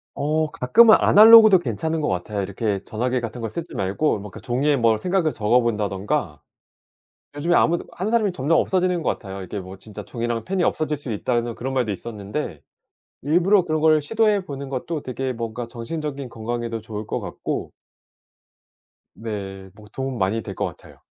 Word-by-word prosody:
어 155 +2 0
가끔은 215 - +6
아날로그도 220 -2 +8
괜찮은 160 -2 -2
것 - - 0
같아요. 95 +3 -2
이렇게 100 +1 -2
전화기 125 +3 -2
같은 115 +1 -6
거 115 - -2
쓰지 170 +7 -7
말고 100 +6 0
막 100 -1 -9
그 - - -10
종이에 140 +4 +1
뭐 115 -3 +3
생각을 180 - 0
적어 115 +3 +3
본다든가 100 -9 -2 1.0
요즘에 170 +4 +1
아무도 170 +1 +2
하는 200 +5 -3
사람이 215 -5 +2
점점 150 +2 +1
없어지는 180 -2 +1
것 - - +1
같아요. 95 -1 -5
이게 100 +3 -5
뭐 95 +1 -10
진짜 105 +1 -10
종이랑 115 -1 -3
펜이 190 -2 0
없어질 155 -2 0
수 135 -5 -6
있다는 120 +2 -1
그런 130 +2 -4
말도 125 -5 0
있었는데 105 - -6 0.6
일부러 175 +7 +3
그런 155 -2 -1
걸 155 -1 +4
시도해 210 +2 +1
보는 140 -4 -7
것도 145 +4 -4
되게 130 +1 -3
뭔가 115 0 -5
정신적인 140 +3 -5
건강에도 115 0 -4
좋을 110 0 -6
것 - - -2
같고 - - -5 1.4
네. 95 -4 -7
뭐 105 0 -15
도움 130 -1 -4
많이 100 +3 0
될 - - -8
것 - - -1
같아요. - - -10
125 Hz, 370 characters per minute, -22 LUFS, 110-160 Hz, 1.4 s, 아날로그도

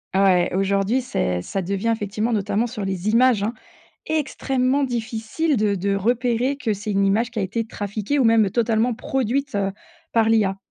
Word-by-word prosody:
Ouais, 185 -3 +3
aujourd'hui, 195 +5 +1
c'est 90 - -1
ça 190 - -3
devient 200 +5 -1
effectivement 215 +2 -2
notamment 210 +2 0
sur 220 -4 -5
les 190 +1 -2
images, 235 -1 +4
hein, 215 +3 -1 0.5
extrêmement 270 -3 0
difficile 240 +4 -1
de 210 -1 +2
de 200 +1 -1
repérer 240 +5 0
que 255 -6 -1
c'est 210 +2 -4
une 195 0 +2
image 220 +5 +1
qui 225 - -6
a - - 0
été 220 +4 -2
trafiquée 210 +6 -3
ou 260 - +3
même 225 -2 +4
totalement 230 +2 +1
produite, 270 +3 -2
heu, 200 -1 0 0.4
par 225 -1 +3
l'IA. 205 -4 +2
220 Hz, 175 wpm, -22 LUFS, 200-245 Hz, 0.5 s, images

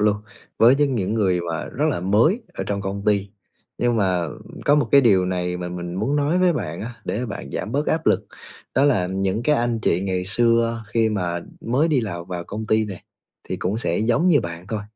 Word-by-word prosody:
luôn 105 0 +3 0.4
với 120 +4 +7
nhưng 145 -3 +2
những 105 -2 -1
người 95 -5 +2
mà 85 -1 -3
rất 145 - -2
là 85 - -2
mới 110 - +3
ở - - -3
trong 100 -1 -2
công 100 +1 -4
ty. 100 -1 +1 0.5
Nhưng 120 -1 +1
mà 90 -5 +1 0.4
có 145 - +5
một 150 - +2
cái 140 - +8
điều 100 -8 +4
này 90 -1 -2
mà 90 0 -5
mình 90 0 -5
muốn 110 +10 0
nói 150 +5 +2
với 185 -1 +4
bạn 90 - -4
á, 115 +2 -6
để 120 +4 -2
bạn 95 -10 -7
giảm 105 - -4
bớt 145 +3 0
áp 160 0 0
lực, - - +2 0.5
đó 135 +3 +4
là 100 -11 +3
những 95 +3 -1
cái 150 +3 +3
anh 120 -1 0
chị 85 - +2
ngày 95 -1 -1
xưa 115 +2 +2
khi 115 +1 +2
mà 90 -5 -2 0.2
mới 135 +8 +1
đi 145 -5 +2
lào 85 -6 -5
vào 90 -1 -5
công 110 +5 -6
ty 110 0 +2
nè 95 -4 -8 0.5
thì - - -2
cũng 100 +5 -2
sẽ 85 -7 0
giống 120 +9 +2
như 155 -8 +5
bạn 85 -1 -7
thôi, 105 +1 -3
105 Hz, 230 wpm, -22 LUFS, 90-120 Hz, 0.5 s, cái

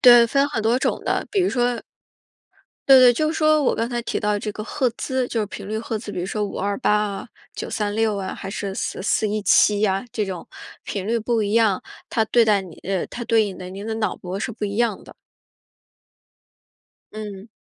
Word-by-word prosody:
对， 240 -2 +8
分 275 +4 +2
很 230 -7 -2
多 235 +3 +3
种 - - -1
的， - - 0
比 395 - +2
如 365 - +2
说 245 -2 0 1.1
对 270 -1 +10
对， 250 -1 +8
就 310 +6 0
说 310 -1 +3
我 - - +2
刚 230 - -1
才 240 0 -2
提 235 - -2
到 210 0 0
这 210 - -4
个 215 +1 -6
赫 255 0 0
兹， 260 -1 -1
就 230 - -2
是 - - +1
频 200 -1 -8
率 215 - -2
赫 225 -1 -3
兹， 210 -1 -7
比 195 - -5
如 175 - -2
说 210 +3 -2
528 200 0 -1
啊， 210 +1 0 0.3
936 215 0 -1
啊， 195 -1 -4
还 195 - -7
是 200 -1 -4
4 - - -3
417 210 0 +3
啊， 195 0 0
这 215 - -1
种 185 -3 -6 0.4
频 195 -2 -4
率 230 +2 +1
不 230 0 0
一 205 0 -1
样， 220 -4 +3 0.3
它 220 - +1
对 235 +1 +3
待 205 -2 +3
你 180 -4 -12
呃， 190 -1 -1
它 240 - -6
对 225 -2 +4
应 195 -2 -5
你 - - -13
的 180 - -7
你 195 +2 -7
的 225 - -3
脑 220 -1 -1
波 185 +2 -5
是 - - -2
不 215 -1 -5
一 200 0 -3
样 230 -4 0
的。 - - -14 2.0
嗯。 210 -1 -7
215 Hz, 215 characters per minute, -22 LUFS, 200-235 Hz, 2.0 s, 对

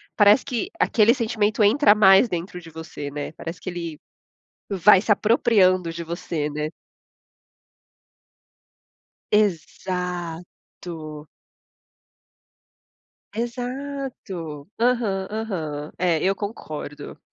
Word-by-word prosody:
Parece 205 +3 +6
que 270 - -3
aquele 225 +1 +4
sentimento 220 -3 0
entra 215 +2 +6
mais 195 +1 +6
dentro 180 -2 -4
de 165 -2 -13
você, 160 -3 -7
né, 145 +1 -5
parece 165 +1 -7
que - - -6
ele 170 -3 -6 0.7
vai 195 0 +6
se 210 +1 +2
apropriando 195 -5 +3
de 170 +1 -5
você, 165 -2 -3
né? 150 +1 -3 2.6
Exato. 175 -4 -3 2.1
Exato. 240 - -5
Aham 230 -6 +1
aham. 160 -9 -4
É, 170 -3 +1
eu 195 +1 +2
concordo. 155 -8 -7
185 Hz, 90 wpm, -23 LUFS, 165-220 Hz, 2.6 s, Parece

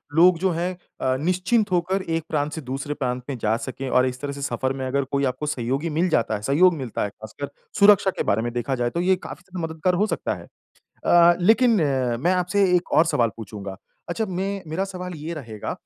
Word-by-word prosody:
लोग 175 +1 +6
जो 190 0 +2
है 175 +2 -1 0.3
अ, 130 0 +1
निश्चिंत 185 - +1
होकर 185 +2 +1
एक 165 - -1
प्रांत 150 -1 0
से 160 - -5
दूसरे 135 +2 -4
प्रांत 125 -3 -3
में 130 - -3
जा 110 +1 +2
सके 130 0 -5
और 125 0 +4
इस 130 0 -3
तरह 145 -1 -3
से 140 - -8
सफ़र 130 0 -1
में 130 - -3
अगर 140 +1 0
कोई 140 +1 -1
आपको 130 +3 -2
सहयोगी 135 +3 -1
मिल 180 +1 +2
जाता 115 -7 +1
है 105 - -5
सहयोग 165 - +4
मिलता 130 -6 -3
है 105 - -1
ख़ासकर, 110 +7 -8 0.3
सुरक्षा 200 -1 +6
के - - 0
बारे 105 +2 +1
में 120 +1 -2
देखा 120 +2 -1
जाए 120 -1 0
तो 170 - -3
ये 190 +1 +3
काफ़ी 185 - -10
ज़्यादा 180 -2 -5
मददगार 160 +3 -1
हो 210 +4 +2
सकता - - -2
है। - - -11 0.6
अ, 175 0 +6
लेकिन 225 +3 +4
अ, 130 -4 0
मैं 170 +10 +1
आपसे 185 +2 +2
एक 180 - 0
और 165 - +5
सवाल 120 -7 +2
पूछूँगा। 100 -3 -7 0.3
अच्छा 215 +6 -1
मैं 195 +2 -3
मेरा 190 +5 -1
सवाल 180 0 -5
ये 160 +2 -5
रहेगा 115 -8 -6
150 Hz, 225 wpm, -23 LUFS, 130-180 Hz, 0.6 s, लोग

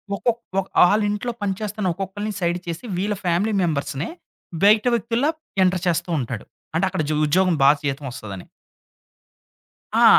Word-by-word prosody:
ఒక్కొక్క 230 -4 -1 0.3
ఆళ్ళ 210 +3 +3
ఇంట్లో 240 +4 -2
పనిచేస్తున్న 205 0 -2
ఒక్కొక్కలని 195 +3 -4
సైడ్ 175 +1 +1
చేసి 170 +7 -5
వీళ్ళ 205 +2 0
ఫ్యామిలీ 185 +6 +1
మెంబర్స్‌ని 140 -2 -1 0.6
బయట 215 +3 +6
వ్యక్తుల్లా 235 +6 0 0.3
ఎంటర్ 185 -1 +1
చేస్తూ 175 +1 0
ఉంటాడు. 115 -3 -4 0.3
అంటే 175 - +3
అక్కడ 185 -4 -1
జో - - +1
ఉద్యోగం 180 +2 +3
బాగా 145 +1 +6
జీతం 140 0 -2
వస్తుందని. 100 -6 -8 1.6
ఆ! - - +6
185 Hz, 135 wpm, -22 LUFS, 160-210 Hz, 1.6 s, బయట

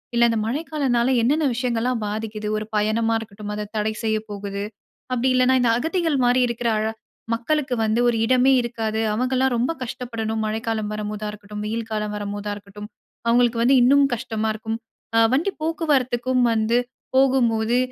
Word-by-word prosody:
இல்ல 235 0 +5
அந்த 225 - 0
மழைக்காலம்னாலே 265 -2 0
என்னென்ன 295 +6 +2
விஷயங்கள்லாம் 245 -1 -1
பாதிக்குது? 215 0 -4
ஒரு 215 - -4
பயணமா 220 +2 +1
இருக்கட்டும், 210 -1 -8
அதை 210 - -4
தடை 215 +1 0
செய்ய 220 -1 +1
போகுது, 200 0 -5 0.5
அப்டி 250 +1 +1
இல்லன்னா, 255 +1 +4
இந்த 240 -2 +3
அகதிகள் 325 0 0
மாரி 245 +1 +4
இருக்கிற 235 0 -2
அழ 215 - 0 0.5
மக்களுக்கு 265 +2 -1
வந்து 220 +2 +1
ஒரு 235 - +2
இடமே 255 +2 +4
இருக்காது, 225 -2 -2
அவுங்கலாம் 255 +3 +1
ரொம்ப 250 +7 +1
கஷ்டப்படணும் 230 -3 -3
மழைக்காலம் 220 -1 -2
வரும்போதா 210 0 -4
இருக்கட்டும், 210 0 -8
வெயில் 225 +1 -3
காலம் 210 -1 -2
வரும்போதா 205 0 -4
இருக்கட்டும், 205 +1 -10 0.4
அவுங்களுக்கு 235 0 +3
வந்து 265 +3 +5
இன்னும் 280 +2 +5
கஷ்டமா 220 -2 -3
இருக்கும். 220 +1 -4 0.4
அ - - +6 0.2
வண்டி 330 +9 +1
போக்குவரத்துக்கும் 260 -6 +1
வந்து 225 +1 +2 0.4
போகும்போது, 240 -3 +3
230 Hz, 150 wpm, -23 LUFS, 215-255 Hz, 0.5 s, அ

